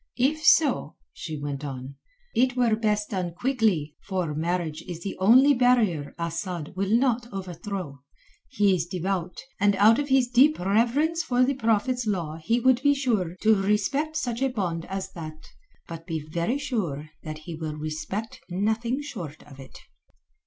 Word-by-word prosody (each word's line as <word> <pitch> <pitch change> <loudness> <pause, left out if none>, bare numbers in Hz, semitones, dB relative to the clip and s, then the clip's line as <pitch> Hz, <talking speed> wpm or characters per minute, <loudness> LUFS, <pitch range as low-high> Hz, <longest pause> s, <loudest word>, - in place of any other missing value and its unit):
"If 285 +5 +1
so," 285 - +4 0.2
she 155 -2 -6
went 145 -1 -4
on, 135 -1 -6 0.4
"it 250 +1 +2
were 235 -3 +3
best 210 -1 0
done 180 -4 -3
quickly, 215 - 0
for 185 -6 -1
marriage 165 0 -2
is 170 -1 -6
the 195 - -4
only 255 +9 +6
barrier 235 - +2
Asad 170 -1 -4
will 195 +1 -1
not 240 -2 0
overthrow. 180 -5 -6 0.5
He 200 -1 +3
is 170 -2 -1
devout, 180 0 -3 0.2
and 205 0 +3
out 215 +5 +5
of 290 0 -2
his 265 -2 +4
deep 260 +5 +5
reverence 240 - +1
for 250 -6 +2
the 275 - +1
Prophet's 230 0 0
law 170 -6 -2
he 200 +10 0
would 255 0 +3
be 285 0 +4
sure 215 - 0
to 220 0 +6
respect 245 +11 0
such 245 -5 -2
a 270 - +2
bond 180 -9 -3
as 190 0 -5
that. 155 -3 -9 0.4
But 165 -1 -8
be 165 -2 -2
very 170 - -1
sure 175 - -3
that 155 0 -6
he 170 - -6
will 155 -1 -5
respect 155 +8 -5
nothing 220 +8 -1
short 170 - -7
of 140 -2 -15
it." 135 - -12
200 Hz, 165 wpm, -26 LUFS, 165-245 Hz, 0.5 s, only